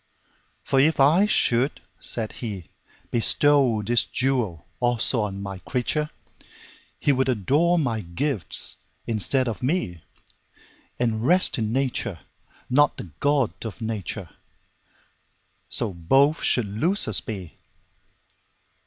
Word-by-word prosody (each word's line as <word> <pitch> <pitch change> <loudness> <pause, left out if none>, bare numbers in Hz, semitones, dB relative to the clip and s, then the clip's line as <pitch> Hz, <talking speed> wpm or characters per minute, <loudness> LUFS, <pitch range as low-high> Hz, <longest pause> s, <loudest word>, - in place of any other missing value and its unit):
For 135 - +1
if 155 +3 +3
I 160 +9 +5
should 130 - +2 0.2
(said 110 -2 -2
He)Bestow 115 - 0
this 120 +1 +3
jewel 125 - -1
also 120 -1 +1
on 100 -1 -4
My 95 -1 -6
creature, 150 +8 -1 0.9
He 145 - +2
would 130 -1 +1
adore 145 - +2
My 120 -9 0
gifts 105 - -2 0.3
instead 120 +4 +1
of 115 - -4
Me, 125 - -1 1.0
And 115 -2 -1
rest 180 0 +3
in 110 -1 -1
Nature, 120 -7 -1 0.5
not 145 +3 +3
the 85 - -8
God 140 - +2
of 110 -1 -7
Nature:So 100 -1 -7
both 135 - +2
should 125 - +2
losers 155 - +2
be. 95 -6 -8
120 Hz, 105 wpm, -24 LUFS, 105-140 Hz, 1.0 s, I